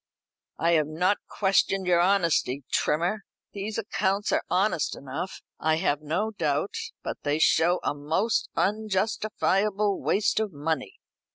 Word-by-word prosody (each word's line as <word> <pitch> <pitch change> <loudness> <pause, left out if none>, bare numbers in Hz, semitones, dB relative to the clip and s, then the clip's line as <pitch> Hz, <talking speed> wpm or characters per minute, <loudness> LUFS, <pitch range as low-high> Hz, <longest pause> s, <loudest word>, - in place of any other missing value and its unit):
"I 170 - +2
have 155 -3 +3
not 180 +6 +1
questioned 195 -1 +1
your 175 -1 +3
honesty, 170 -7 +2
Trimmer. 175 +8 +1 0.3
The 200 +2 -4
accounts 205 -2 0
are - - +2
honest 185 -5 +1
enough, 140 +7 -6 0.2
I 160 0 +2
have 150 -2 0
no 175 +9 -1
doubt, 155 -2 -1 0.3
but - - -4
they 145 +1 0
show 170 +2 +3
a - - 0
most 160 +10 0
unjustifiable 210 -1 0
waste 210 +1 +1
of 215 -4 -2
money." 150 -1 -3
185 Hz, 130 wpm, -26 LUFS, 155-205 Hz, 0.3 s, have